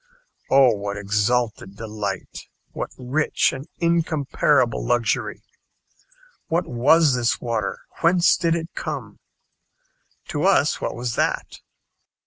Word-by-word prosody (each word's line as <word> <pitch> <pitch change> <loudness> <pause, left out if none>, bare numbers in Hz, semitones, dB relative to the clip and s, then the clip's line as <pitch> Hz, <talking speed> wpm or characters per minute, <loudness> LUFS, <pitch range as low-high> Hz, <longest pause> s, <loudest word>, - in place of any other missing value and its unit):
Oh! 135 -2 +6
what 100 0 -4
exalted 105 0 -1
delight 105 -1 -5 0.2
what - - -4
rich 130 +5 0
and 135 +4 -7
incomparable 155 -6 +1
luxury! 120 -3 -1 1.0
What 170 +2 0
was 145 +5 +4
this 120 -2 +1
water, 115 -4 -2 0.2
whence 175 +1 +4
did 170 -2 +1
it 165 0 -5
come? 135 -10 -6 1.1
To - - -2
us - - +3
what - - -3
was 120 -1 -3
that? - - -1
125 Hz, 110 wpm, -23 LUFS, 110-155 Hz, 1.1 s, Oh